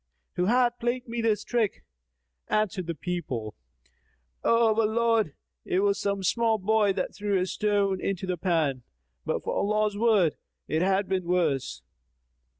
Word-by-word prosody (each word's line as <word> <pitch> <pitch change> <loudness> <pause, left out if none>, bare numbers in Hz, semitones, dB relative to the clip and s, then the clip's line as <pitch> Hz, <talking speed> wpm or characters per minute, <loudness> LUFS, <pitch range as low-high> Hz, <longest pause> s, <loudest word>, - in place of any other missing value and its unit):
Who 180 - 0
hath 240 +2 +2
played 240 +1 -2
me 235 0 -3
this 215 -2 +1
trick?" 230 -4 -1 0.6
Answered 195 -4 0
the 170 - -3
people, 135 -10 -4 0.9
"O 230 -1 +4
our 220 - +4
lord, 225 -6 +1 0.3
it 185 - 0
was 200 0 +2
some 200 -1 -1
small 225 +3 +2
boy 210 0 +2
that - - -3
threw 205 -1 0
a 180 - +1
stone 200 -1 0
into 195 -1 -2
the 185 -1 -1
pan: 160 -7 0 0.5
but - - -1
for - - -2
Allah's 210 0 0
word, 210 -9 +3 0.3
it 160 - 0
had 195 +1 +2
been 185 -2 -1
worse." 145 - 0
200 Hz, 150 wpm, -27 LUFS, 180-220 Hz, 0.9 s, O